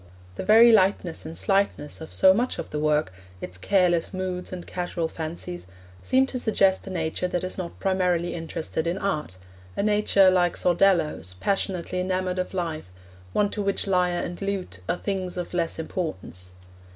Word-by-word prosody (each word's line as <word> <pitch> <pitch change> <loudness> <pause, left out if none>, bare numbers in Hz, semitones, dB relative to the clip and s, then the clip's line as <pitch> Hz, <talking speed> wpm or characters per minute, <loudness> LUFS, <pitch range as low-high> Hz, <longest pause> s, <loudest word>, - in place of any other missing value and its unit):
The - - -5
very 225 +2 +7
lightness 190 -6 +2
and 160 - -7
slightness 195 -7 0
of 160 - -8
so 190 0 +6
much 245 +5 0
of - - -6
the 150 - -2
work, 150 -6 +1 0.3
its 90 - -7
careless 180 - +2
moods 185 -1 -4
and 180 -1 -6
casual 175 -2 -3
fancies, 165 - -6 0.3
seem 260 +1 +3
to 260 -1 -3
suggest 195 -5 +2
a - - -4
nature 170 0 -2
that 180 0 -2
is 185 - -3
not 175 -3 -6
primarily 180 -3 +1
interested 165 -1 -3
in 175 +2 -1
art 155 - -2 0.4
a - - +1
nature, 205 -2 +4
like 175 -2 +2
Sordello's, 170 - +2
passionately 185 - -1
enamoured 185 0 -1
of 185 +1 -3
life, 165 - -3 0.4
one 205 - +1
to 210 - -2
which 200 0 -1
lyre 180 -2 +1
and 175 +2 -7
lute 195 - -3
are - - +1
things 185 -2 -3
of 180 0 -5
less 170 -2 0
importance. 95 - -5
180 Hz, 170 wpm, -25 LUFS, 165-195 Hz, 0.4 s, very